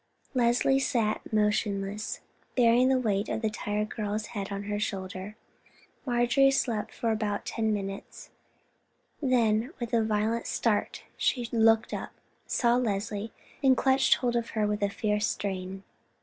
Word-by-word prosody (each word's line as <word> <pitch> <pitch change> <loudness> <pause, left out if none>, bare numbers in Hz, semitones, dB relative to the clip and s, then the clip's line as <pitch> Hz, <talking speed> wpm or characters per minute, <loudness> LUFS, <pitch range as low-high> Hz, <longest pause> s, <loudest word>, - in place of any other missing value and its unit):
Leslie 245 +2 +3
sat 230 -5 0
motionless, 210 -1 0 0.4
bearing 245 +1 +5
the 265 - +4
weight 210 -4 0
of 225 - -2
the 220 - +1
tired 210 0 -2
girl's 210 0 -2
head 200 -2 -4
on 200 0 -3
her 205 0 -2
shoulder. 190 0 -4 0.7
Marjorie 245 +3 +4
slept 225 -5 0
for 230 - -1
about 215 -2 -1
ten 220 -1 -1
minutes, 195 -1 -5 0.9
then 240 -2 +2
with 240 -1 -5
a 230 -1 +4
violent 220 +2 0
start 220 -3 0
she 245 -3 0
looked 225 -1 +3
up, - - -5 0.3
saw 240 -1 +2
Leslie, 210 -2 -2 0.3
and 265 -2 +5
clutched 265 0 +4
hold 240 -2 -1
of 235 -1 -1
her 215 - +3
with 210 0 -1
a 205 - +2
fierce 210 +1 0
strain. 190 -1 -4
220 Hz, 145 wpm, -28 LUFS, 205-240 Hz, 0.9 s, bearing